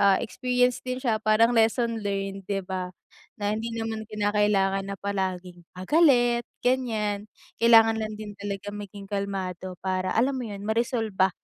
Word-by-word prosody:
ah, 200 -1 +5
experience 250 +1 0
din 255 0 -3
siya, 230 -4 0
parang 215 +2 +4
lesson 230 +1 +2
learned, 195 -1 -3
'di 200 -1 0
ba? 185 -1 -3 0.5
Na 205 0 0
hindi 225 +2 -3
naman 225 -1 -3
kinakailangan 205 -2 +1
na 200 - -4
palaging, 185 -3 -3 0.2
ah, 185 - -5
galit, 245 -7 +4 0.2
ganyan, 215 -5 0 0.3
kailangan 225 -1 +7
lang 215 0 -4
din 210 -1 -7
talaga 200 0 -5
maging 200 -1 -8
kalmado 190 -3 -4
para, 185 0 0
alam 260 +4 +3
mo 260 - -3
yun, 200 -1 -7
ma-resolba 220 -4 +1
210 Hz, 150 wpm, -26 LUFS, 195-230 Hz, 0.5 s, kailangan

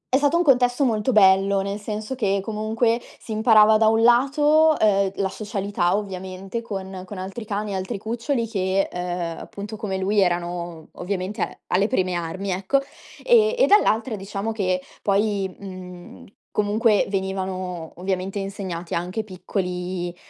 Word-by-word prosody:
è - - +7
stato 290 +4 +2
un 345 - +3
contesto 250 -2 +3
molto 225 +1 +1
bello, 195 -2 +5
nel 200 +1 -2
senso 215 +4 -5
che 200 -5 +1
comunque 225 +3 0 0.2
si 220 - -7
imparava 220 -1 +6
da 220 0 +4
un 225 +1 +3
lato, 295 +6 +5
uhm, 200 -2 +3
la 195 - 0
socialità 200 -3 -1
ovviamente 190 +1 -5
con 190 -4 -6
con 200 +1 -8
altri 195 +5 -6
cani, 205 -1 -3
altri 190 +4 -3
cuccioli 230 +4 -2
che, 195 -2 0
uhm, 175 -2 -3
appunto, 205 +2 -8
come 205 -3 -3
lui 200 +2 +2
erano 175 -2 -2
ovviamente 185 +2 -4
a - - -3
alle 195 +3 +2
prime 185 -7 0
armi, 175 +3 -3
ecco, 195 +9 +1 0.5
e 470 -1 +5
e - - +5
dall'altra 230 - +3
diciamo 200 +2 -4
che 185 -4 0 0.2
poi, 200 -2 0
mhmm, 185 -2 -10 0.2
comunque 210 +1 +2
venivano 185 -3 -3
ovviamente 190 +2 -2
insegnati 190 -3 -5
anche 180 +6 -2
piccoli 180 -2 -4
200 Hz, 150 wpm, -23 LUFS, 185-220 Hz, 0.5 s, è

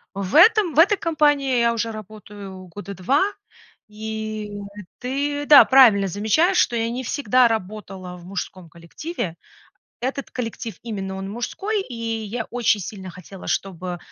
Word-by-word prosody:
В 195 -2 -4
этой 430 +7 +7
в 300 - +2
этой 395 +5 +6
компании 290 -6 +2
я 235 0 +3
уже 230 0 -2
работаю 205 -3 -10
года 200 +3 -8
2. 225 - +1 0.7
И 215 0 -5 0.5
ты, 285 +3 -2
да, 290 -1 +9
правильно 230 -7 +6
замечаешь, 220 - +2
что 240 - +3
я 230 0 0
не 250 +2 -4
всегда 255 -1 +3
работала 195 -4 -5
в 175 - -14
мужском 185 -1 -6
коллективе. 170 - -6 0.7
Этот 265 +2 -3
коллектив, 230 -2 -5
именно 195 -4 -5
он, 195 0 -5
мужской, 395 - -2
и 260 - -10 0.3
я 225 +2 -4
очень 235 -3 +1
сильно 190 0 -7
хотела, 190 +1 -12
чтобы, 180 -2 -3
220 Hz, 145 wpm, -22 LUFS, 195-265 Hz, 0.7 s, да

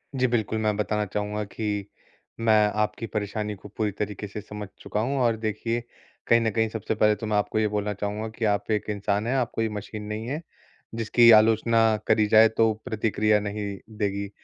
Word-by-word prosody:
जी, 130 -1 +2
बिल्कुल। 110 -2 0
मैं 105 -1 +1
बताना 105 0 0
चाहूँगा 105 +1 -3
कि 105 -1 -3 0.5
मैं 115 -1 +3 0.3
आपकी 105 +2 -2
परेशानी 105 0 -3
को 100 +1 -13
पूरी 105 -2 0
तरीके 105 0 -4
से 105 +2 -7
समझ 105 0 -8
चुका 105 - -3
हूँ 135 +6 -1
और 120 -2 +3
देखिए 115 +2 -2 0.4
कहीं 115 - +5
न 115 - +1
कहीं 110 +1 +1
सबसे 110 0 -3
पहले 105 0 +3
तो 105 - -6
मैं 105 -1 +1
आपको 105 +1 0
ये 110 - +2
बोलना 105 0 -2
चाहूँगा 105 +2 -3
कि 115 - -1
आप 105 +1 0
एक 105 -1 0
इंसान 100 +1 -1
हैं 130 - 0
आप 125 -3 0
कोई 115 - 0
ये - - -1
मशीन 105 +1 -6
नहीं 105 +2 -5
है 145 +5 -3 0.5
जिसकी 115 +1 +5
आलोचना 110 0 +5
करी 110 - +3
जाए 110 +1 +7
तो 110 0 +2
प्रतिक्रिया 110 -2 +1
नहीं 105 -1 -4 0.2
देगी। 100 -1 -2
105 Hz, 200 wpm, -25 LUFS, 105-115 Hz, 0.5 s, जाए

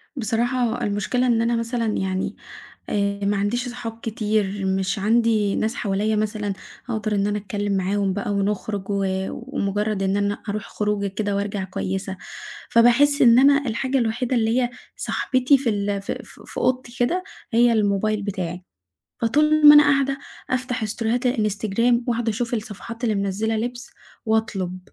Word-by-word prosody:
بصراحة 240 +1 0
المشكلة 215 +5 0
إن 230 -2 +3
أنا 235 +1 +1
مثلًا 230 0 -1
يعني 190 0 -2 0.5
آآ، 200 -1 -1
معنديش 205 +5 0
صحاب 235 -2 -6
كتير، 210 -3 -1
مش 190 +2 -1
عندي 215 -1 +2
ناس 220 +1 0
حواليا 210 +1 0
مثلًا 210 -1 -1 0.4
أقدر 215 -1 -1
إن 200 0 +1
أنا 210 0 0
أتكلم 205 0 -2
معاهم 195 +1 0
بقى 205 +1 -3
ونخرج 200 0 -2
و 200 -1 0 0.3
ومجرد 210 -5 -2
إن 195 +1 +1
أنا 205 0 -1
أروح 205 0 -2
خروجة 210 -1 -1
كده 200 +1 -2
وأرجع 200 -1 -2
كويسة، 190 +1 -4 0.5
فباحس 245 +5 +5
إن 235 -1 +7
أنا 280 +1 +5
الحاجة 260 +3 0
الوحيدة 240 +2 0
اللي 225 +2 +2
هي 245 -1 0 0.3
صاحبتي 260 +1 +2
في 255 -3 0
ال 200 -1 -1
في - - -4
في - - -15
في - - -11
أوضتي 250 -1 -1
كده 340 +10 +1 0.3
هي 235 +1 +5
الموبايل 210 0 +1
بتاعي، 185 -3 -4 0.6
فطول 300 +5 +5
ما 295 - +11
أنا 295 - +9
قاعدة 275 -1 +2 0.3
أفتح 250 -2 -1
ستوريهات 230 +3 -1
الإنستجرام 230 +1 +1
وأقعد 235 -1 0
أشوف 230 +2 -1
الصفحات 230 +2 -6
اللي 220 -3 +1
منزلة 200 +3 -1
لبس، 245 +3 -4 0.4
وأطلب 210 -5 -1
220 Hz, 150 wpm, -23 LUFS, 200-240 Hz, 0.6 s, ما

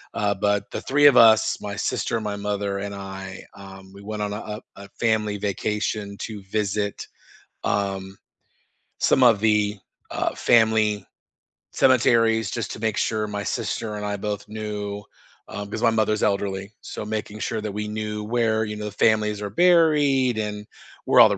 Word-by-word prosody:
Uh, 105 -2 +1
but, 100 +1 +1
the - - -4
3 145 +2 +2
of 140 - +8
us- 110 -1 +6
my 100 -1 -5
sister, 110 +2 -1
my 105 -1 -3
mother, 100 -1 -2
and 100 0 -5
I- 95 -1 -8
um, 95 -1 -12
we 100 - -12
went 105 +1 -5
on 105 0 -3
a - - -3 0.2
a - - -9 0.2
a - - -16
family 110 -3 +1
vacation 105 0 -2
to 105 -3 -6
visit, 100 0 -2 0.6
um, 95 -1 -2 0.8
some 135 - +3
of 115 -4 +5
the, 105 -1 +2 0.3
uh, - - -1
family 110 -2 +3 0.7
cemeteries, 115 -3 +3
just 115 - -3
to - - -7
make 110 -2 -1
sure 110 -1 0
my 105 -1 -4
sister 105 +2 -3
and 105 0 -4
I 105 0 -2
both 105 0 -4
knew, 105 -1 -5 0.4
um 100 0 -6
'cause 110 - -4
my 115 - +6
mother's 110 -1 +1
elderly, 100 0 -1
so - - -7
making 105 0 -4
sure 110 0 -2
that 105 -1 -4
we 105 +1 -4
knew 105 0 -4
where, 110 0 +1
you 105 0 -5
know, 105 0 -5
the 105 - -4
families 105 -1 +2
are 100 - -3
buried, 145 - +4
and 105 -1 -3 0.4
where - - +5
all - - +8
the - - -1
105 Hz, 175 wpm, -24 LUFS, 100-110 Hz, 0.8 s, of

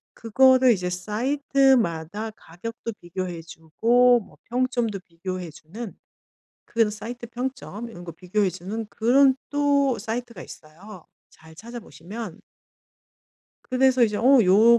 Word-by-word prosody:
그거를 260 +2 +5
이제 180 -3 -2
사이트마다 220 - +1
가격도 230 +6 -8
비교해 175 -1 -5
주고 235 +10 +3
뭐 195 - -17
평점도 240 -4 -1
비교해 180 0 -6
주는 195 +9 -9 0.7
그런 225 -2 +1
사이트 230 +3 -7
평점 245 -2 -5
이런 175 -6 -11
거 175 - -7
비교해 185 +3 0
주는 200 +5 -6
그런 260 +5 +4
또 285 -3 +2
사이트가 235 +2 -5
있어요. 175 +4 -13 0.2
잘 160 0 -17
찾아보시면 215 - -9 1.3
그래서 260 0 +4
이제 210 -3 +2
'어 260 +4 +6
요 220 +6 +6
225 Hz, 265 characters per minute, -24 LUFS, 180-245 Hz, 1.3 s, 어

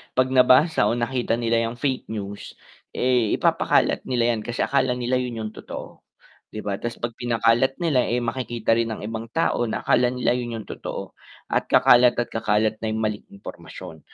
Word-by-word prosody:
'pag 130 0 +2
nabasa 130 0 +5
o 115 - +1
nakita 120 0 -1
nila 115 -1 +1
yung 115 - -6
fake 130 +1 -2
news 100 -2 -7 0.4
eh, 125 -4 +2
ipapakalat - - +2
nila 120 -2 +1
yan 110 - -5
kasi 120 - -5
akala 135 -2 +1
nila 125 +1 -1
yun 125 -2 -4
yung 110 - -5
totoo, - - -9 0.4
di 110 - -8
ba 100 -1 -3
tas 120 0 -4
'pag 120 - -4
pinakalat 120 +2 +2
nila 155 -6 +2
eh, 120 +1 0
makikita 120 -2 -1
rin 115 -1 -1
ang - - -10
ibang 110 +1 -5
tao 140 -7 +1
na 110 - -3
akala 125 - +3
nila 125 0 0
yun 120 -1 -2
yung 110 -2 -8
totoo - - -6 0.4
at - - 0
kakalat 120 0 +5
at 120 - -2
kakalat 110 0 0
na 110 - -3
yong - - -2
maling 105 -1 -3
impormasyon, 100 -4 -10
120 Hz, 185 wpm, -23 LUFS, 110-125 Hz, 0.4 s, nabasa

